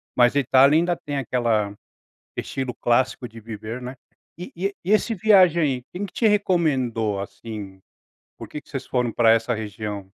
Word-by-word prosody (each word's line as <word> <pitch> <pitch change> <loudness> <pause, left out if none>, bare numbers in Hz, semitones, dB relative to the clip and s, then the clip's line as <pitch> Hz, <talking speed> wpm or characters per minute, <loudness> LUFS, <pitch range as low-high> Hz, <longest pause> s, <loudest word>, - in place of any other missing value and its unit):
mas 120 +2 +4
a - - +4
Itália 135 +3 +5
ainda 175 +1 +1
tem 145 -3 -5
aquela 115 -5 0 0.6
estilo 130 -2 -4
clássico 125 +1 +1
de 115 0 -12
viver, 110 +2 -7
né. 125 +1 -7 0.4
E 180 - -8
e 195 +3 -2
e 190 - -3
esse 225 +2 +2
viagem 185 -4 +5
aí, 130 -4 0
quem 195 +3 -4
que 190 - -8
te 230 - +1
recomendou, 130 - +1
assim? 100 -1 -8 0.6
Por - - -9
que 150 - -7
que - - -28
vocês 135 -2 -5
foram 125 -2 0
para 115 -2 +4
essa 115 +1 +1
região? 105 -1 -5
125 Hz, 175 wpm, -23 LUFS, 110-165 Hz, 0.6 s, Itália